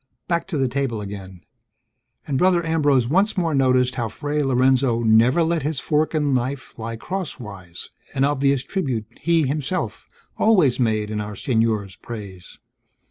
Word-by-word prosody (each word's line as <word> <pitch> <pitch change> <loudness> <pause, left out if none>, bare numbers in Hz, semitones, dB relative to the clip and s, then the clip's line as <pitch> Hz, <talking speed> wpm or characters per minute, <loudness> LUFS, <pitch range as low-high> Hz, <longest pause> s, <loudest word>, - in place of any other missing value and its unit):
Back 170 0 0
to 175 -5 -3
the 135 -1 +2
table 125 -3 -2
again; 95 -3 -8 0.8
and 140 -4 -1
Brother 180 -2 +3
Ambrose 145 -6 +2
once 195 - +2
more 165 -3 +1
noticed 130 -2 +3
how 120 -4 -2
Fray 145 +5 -2
Lorenzo 130 -2 +2
never 115 +8 +4
let 165 0 0
his 150 0 -2
fork 155 +1 0
and 145 -3 +1
knife 130 0 -3
lie 115 +1 -4
crosswise, 110 - -7 0.2
an 135 - +2
obvious 140 -2 +2
tribute 130 - -2
he, 165 0 +2
himself, 150 +6 -3 0.3
always 180 - +4
made 110 -3 0
in 105 -1 -2
Our 105 0 -6
Senor's 110 -4 0
praise. 100 -6 -9
130 Hz, 150 wpm, -22 LUFS, 115-155 Hz, 0.8 s, never